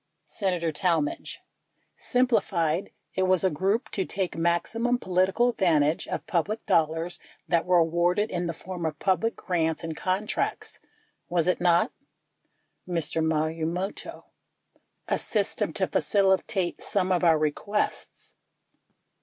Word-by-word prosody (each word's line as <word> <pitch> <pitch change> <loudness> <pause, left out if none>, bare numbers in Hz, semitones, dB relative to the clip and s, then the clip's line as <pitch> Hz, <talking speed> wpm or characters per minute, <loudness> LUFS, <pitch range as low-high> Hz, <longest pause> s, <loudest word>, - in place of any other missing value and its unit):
Senator 180 -5 -1
Talmadge. 165 -3 -1 0.5
Simplified, 195 - +1 0.2
it - - -1
was 185 -1 +3
a 190 - +3
group 195 - 0
to 195 - 0
take 190 -1 -3
maxi 170 +7 0
mum 245 +1 +2
political 190 +4 +2
advantage 165 -8 +2
of - - -4
public 205 +6 -1
dollars 165 +2 +1 0.3
that 170 0 +1
were 180 -1 +5
awarded 175 +5 +2
in 175 -1 -2
the 165 - -2
form 180 +1 -7
of 155 -1 -2
public 190 +6 +1
grants 160 -4 -1
and 165 -1 -4
contracts, 190 +6 -2 0.5
was 175 -1 +1
it 180 - +1
not? 175 +6 +3 1.0
Mr. 165 -2 0
Marumoto. 160 +4 -2 0.8
A - - +1
system - - -1
to - - +1
facilitate 190 -2 +1
some 190 -2 0
of 180 -1 +2
our 165 -2 +5
requests. 155 +7 -2
180 Hz, 125 wpm, -27 LUFS, 165-195 Hz, 1.0 s, were